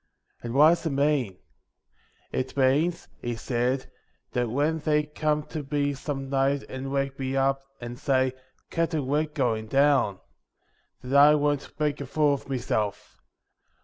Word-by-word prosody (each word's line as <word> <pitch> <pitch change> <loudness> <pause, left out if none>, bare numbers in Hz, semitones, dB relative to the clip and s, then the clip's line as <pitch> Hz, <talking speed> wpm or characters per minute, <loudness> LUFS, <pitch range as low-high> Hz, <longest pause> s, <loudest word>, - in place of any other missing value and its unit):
' - - -43
1 - - -6
And 115 - -4
what 150 +3 +8
does 170 - +2
that - - +1
mean? 140 -8 +1 0.5
' - - -38
'It 130 - -3
means,' 145 +6 +2
he 120 -1 -3
said, 125 +2 -1 0.5
'that 120 -1 0
when 150 +6 0
they 150 0 +2
come 150 0 -1
to 155 0 -6
me 145 -1 +1
some 135 0 -5
night 135 +1 +1
and 130 +1 -6
wake 135 0 -1
me 135 0 -2
up, 135 0 +2 0.2
and 120 +1 -7
say, 130 -3 +1 0.4
"Captain, 165 -4 0
we're 145 +4 +1
going 120 -8 -1
down," 135 -7 +3 0.8
that 130 +2 -2
I 145 +2 +8
won't 145 0 -1
make 150 -1 0
a 140 - -5
fool 145 0 +2
o' - - -18
meself. 110 -6 -2
140 Hz, 165 wpm, -26 LUFS, 130-150 Hz, 0.8 s, what